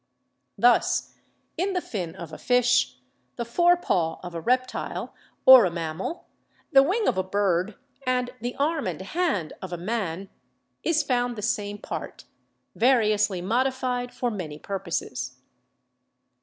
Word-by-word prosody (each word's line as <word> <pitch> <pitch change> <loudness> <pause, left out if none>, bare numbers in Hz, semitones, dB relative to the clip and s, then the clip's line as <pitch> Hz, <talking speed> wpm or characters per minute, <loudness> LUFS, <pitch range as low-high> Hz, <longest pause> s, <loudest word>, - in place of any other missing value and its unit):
Thus, - - +3 0.4
in 380 +4 0
the 365 - +1
fin 180 - -5
of 170 -4 -9
a - - -8
fish, 245 - +2 0.4
the 235 - -3
fore 345 +9 +4
paw 165 - 0
of 180 -1 -7
a 165 - -4
reptile 255 +5 -1 0.3
or 260 -2 +11
a - - +2
mammal, 170 - -4 0.5
the 270 -2 +8
wing 390 +10 +1
of 190 - +2
a - - +1
bird, 190 0 0 0.3
and 250 -1 +1
the 245 +1 -3
arm 300 - 0
and 175 -4 -3
hand 200 - -1
of 190 - -7
a 175 - -3
man, 190 -1 -3 0.5
is 315 -2 +2
found 245 -3 0
the 210 - -6
same 205 -2 -1
part, - - -7 0.5
variously 215 -6 +2
modified 250 +3 0
for 245 -1 -2
many 165 -8 -5
purposes. 140 -9 -4
215 Hz, 145 wpm, -26 LUFS, 180-255 Hz, 0.5 s, or